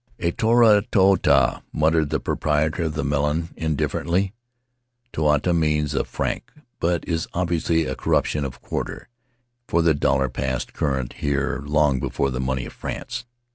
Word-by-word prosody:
"A 85 -1 0
toru 110 0 +5
toata" 95 -2 +4
muttered 80 0 +2
the 80 - 0
proprietor 80 +2 0
of 80 - -3
the - - -1
melon, 75 +3 0
indifferently. 85 +4 -1 0.8
("Toata" 75 +3 +2
means 75 -3 +1
a 70 - +1
franc, - - -4 0.3
but 85 0 0
is 80 -2 -1
obviously 85 -2 +1
a 65 - -2
corruption 75 - 0
of 65 -2 -7
quarter, - - -5 0.6
for 85 - +2
the 80 -1 +4
dollar 70 -2 +1
passed 65 0 -3
current 65 -4 -1
here 70 -1 -1
long 75 -3 +2
before 70 +2 -1
the 65 - -3
money 65 -1 -1
of - - -9
France.) 125 0 -5
75 Hz, 145 wpm, -23 LUFS, 70-85 Hz, 0.8 s, toru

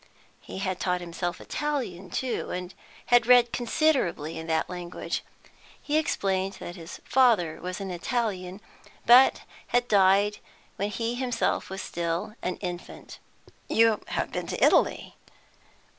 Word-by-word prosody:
He - - -9
had 190 -1 -2
taught 180 -1 0
himself 175 0 -4
Italian, 250 -12 -3
too, 255 +6 -2
and 180 +1 -5 0.4
had 240 -1 +6
read 245 -1 +6
considerably 240 - 0
in 160 0 -6
that 160 -1 0
language. 180 -1 -5 0.6
He 295 - -3
explained 195 -9 -1
that 175 - -8
his 165 -2 -9
father 225 -11 +3
was 180 +2 -5
an 195 -1 -5
Italian, 190 -1 -3 0.4
but 250 +3 +7 0.3
had 245 0 +1
died 200 0 +4 0.4
when 200 +1 -2
he 230 +2 -2
himself 245 -1 -1
was 190 0 -5
still 170 +4 -3
an 180 - -2
infant. 175 -2 -7 0.5
"You 225 -1 +4
have - - -2
been - - -4
in - - -3
Italy?" - - +2
195 Hz, 135 wpm, -27 LUFS, 180-240 Hz, 0.6 s, but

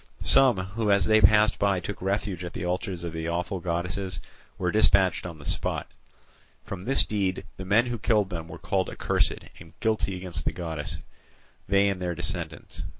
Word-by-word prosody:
Some 130 -6 +5
who 100 +4 -2
as 100 -1 +4
they 110 0 +4
passed 105 +3 +5
by 100 -2 +2
took 95 +1 -6
refuge 95 -1 -2
at 85 - -6
the 90 - -4
altars 90 0 -3
of 85 -1 -5
the 80 0 -3
awful 90 +3 -2
goddesses 90 +1 -3 0.4
were 90 -2 0
dispatched 95 -4 +3
on 85 -2 -8
the 70 - -13
spot. - - -2 0.7
From 95 -2 -6
this 135 +8 +2
deed 95 -3 -1
the 95 - -6
men 105 +5 +4
who 120 -2 -3
killed 105 -3 +2
them 80 -2 -5
were - - -9
called - - -1
accursed - - +1 0.3
and 80 -1 -14
guilty 110 -4 0
against 90 -1 -4
the - - -1
goddess, 80 -4 -4 0.7
they 100 0 +4
and 95 -2 -1
their 90 -1 -2
descendants. - - -1
95 Hz, 185 wpm, -26 LUFS, 85-105 Hz, 0.7 s, Some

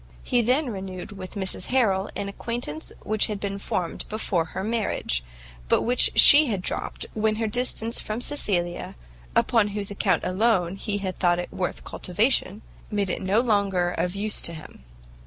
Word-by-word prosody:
He 245 - +2
then 255 +3 +1
renewed 190 -1 -7
with 190 -1 -9
Mrs 190 -2 -2
Harrel 210 -7 +2
an 200 0 -3
acquaintance 200 -6 -5
which 215 0 +1
had 210 -2 -4
been 200 0 -4
formed 180 -3 -3
before 200 -6 -1
her 190 +3 -5
marriage, 210 - -1 0.5
but - - +3
which 245 +1 +4
[he] 295 +1 +9
had 200 -6 -2
dropt - - -3
when 215 0 +1
her 225 +1 -1
distance 230 0 0
from 215 +2 -4
Cecilia, 185 -11 -1 0.4
upon 225 -3 +3
whose 205 -1 -2
account 200 - +1
alone 185 -2 +1
he 205 0 -2
had 190 -2 -4
thought 175 -1 +3
it 175 - -5
worth 180 -1 -3
cultivation, 205 +1 -1 0.3
made 205 -3 -1
it - - -3
no 195 +4 +2
longer 200 -6 +1
of 180 +2 -2
use 210 +1 +1
to 170 - +1
him. 155 - -12
200 Hz, 170 wpm, -25 LUFS, 185-225 Hz, 0.5 s, he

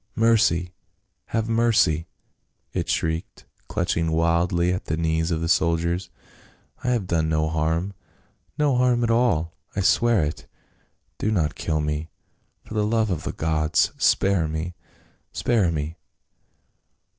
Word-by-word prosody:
" - - -42
Mercy! 90 -6 +2 0.5
have 115 -1 -1
mercy 115 -9 +2 0.3
!" - - -49 0.3
it - - -2
shrieked, 80 +1 -2 0.2
clutching 80 -1 0
wildly 85 +2 +2
at 90 - -4
the 80 - -2
knees 80 0 0
of 80 -2 -1
the 85 - -1
soldiers. 85 +1 +1 0.4
" - - -31
I - - -3
have 120 -6 +1
done 80 -3 0
no 80 0 +1
harm 80 +4 -1 0.3
— - - -41
no 145 -3 +2
harm 125 -1 +3
at 115 - +1
all 100 -9 +2
— - - -32
I 100 - 0
swear 105 +1 +3
it! 75 0 -4 0.7
Do 110 - 0
not 80 -8 +1
kill 80 -2 -1
me! 75 +1 -2 0.6
For - - -9
the 105 -1 +1
love 110 -1 +1
of 80 -4 -3
the - - -2
gods, 80 -1 +1
spare 95 -5 +3
me! 80 +3 -4 0.6
spare 105 -8 +1
me 80 +1 -4
85 Hz, 155 wpm, -24 LUFS, 80-105 Hz, 0.7 s, harm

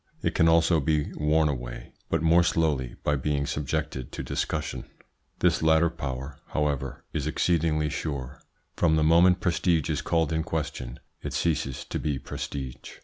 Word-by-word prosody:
It - - +1
can 80 - +4
also 80 0 +4
be 75 0 0
worn 75 +1 +2
away, - - -5 0.2
but - - 0
more 85 +2 +6
slowly 75 -7 +1
by 75 - +2
being 70 +1 0
subjected 75 -2 -3
to - - -4
discussion. 75 -1 -3 0.6
This - - +3
latter 80 +1 +4
power, 70 -3 -5
however, 70 -3 -2
is 75 -2 -1
exceedingly 80 -1 +1
sure. 70 -2 -4 0.3
From 80 -2 +3
the 80 - +2
moment 85 +4 +5
prestige 85 -4 +1
is 75 0 -1
called 80 -2 +1
in 80 - +1
question 70 -6 -4 0.2
it - - -5
ceases 75 -6 -1
to - - -4
be 75 -3 -1
prestige. 65 -1 -6
75 Hz, 155 wpm, -27 LUFS, 70-80 Hz, 0.6 s, more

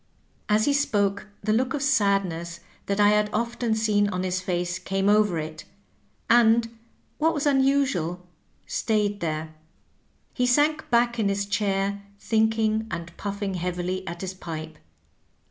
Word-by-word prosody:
As 215 +1 +3
he 285 - +2
spoke 205 -8 0 0.2
the 215 +1 +1
look 255 +4 +1
of 285 - -2
sadness 195 -9 +1 0.3
that 200 +1 -1
I 205 0 +6
had 210 0 +2
often 235 +1 -1
seen 210 -2 +2
on 180 -2 -2
his 185 0 -1
face 180 -1 -2
came 195 0 -1
over 205 -4 +3
it, 155 0 -5 0.6
and, 230 0 +4 0.4
what 325 +2 +2
was 290 - -1
unusual, 265 - +1 0.4
stayed 210 -2 0
there. 155 -2 -3 0.8
He 250 -1 +1
sank 300 +5 +2
back 235 0 +2
in 205 -2 +2
his 200 0 -1
chair 200 -1 -1 0.2
thinking 220 0 +1
and 170 -3 -6
pujQSing 200 -2 -4
heavily 180 +1 -3
at 170 0 -6
his 190 -1 -4
pipe. 160 -3 -7
205 Hz, 145 wpm, -25 LUFS, 180-230 Hz, 0.8 s, I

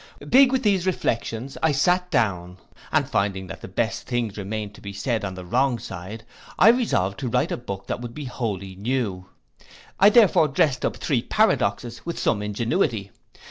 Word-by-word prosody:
Big 265 0 +6
with 265 0 0
these 195 -3 +2
reflections, 120 -6 -2
I 160 -2 +3
sate 180 +6 +2
down, 90 - 0 0.3
and - - +2
finding 100 -1 -1
that - - -9
the - - -7
best - - -2
things 120 -4 -2
remained 105 +1 -5
to - - -15
be 100 0 -7
said 110 +1 -2
on 95 -2 -4
the 90 -1 -8
wrong 125 +7 +1
side, 105 +2 -8 0.3
I - - +7
resolved 100 - +1
to 130 - -3
write 125 +2 +1
a - - 0
book 100 -5 -7
that - - -4
should 120 -1 -7
be 150 - -6
wholly 100 -7 -4
new. 100 -4 -2 0.7
I 200 - +8
therefore 210 -8 +5
drest 135 -1 +1
up - - -1
three 135 -6 0
paradoxes 120 - 0
with 170 - -5
some 105 -3 0
ingenuity. 105 -1 -1
115 Hz, 180 wpm, -24 LUFS, 100-145 Hz, 0.7 s, I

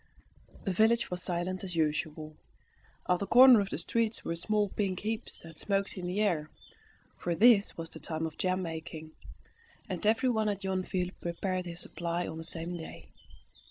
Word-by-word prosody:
The 195 - -1
village 225 +3 +3
was 180 0 -3
silent 180 +1 -2
as 180 -2 -5
usual. 155 -1 -1 0.7
At 180 0 +3
the 200 - -3
corner 250 -1 +9
of 200 -1 -1
the - - -3
streets 230 -1 -1
were 165 - -1
small 210 +4 +1
pink 190 -3 -2
heaps 220 +2 -3
that 165 -1 -11
smoked 200 -1 0
in 180 -2 -5
the 185 +4 -1
air, 160 -7 +1 0.7
for 175 -1 -1
this 215 0 +5
was 165 0 -5
the - - -7
time 160 0 -3
for 160 - -9
jam 185 0 0
making, 160 -1 -6 0.8
and 185 -4 -4
everyone 220 0 +2
at 200 -1 -3
Yonville 185 -1 -1
prepared 180 +1 -2
his 170 0 -5
supply 170 0 -3
on 160 - -6
the - - -6
same 165 +1 -4
day. 165 -2 -9
185 Hz, 175 wpm, -31 LUFS, 165-205 Hz, 0.8 s, corner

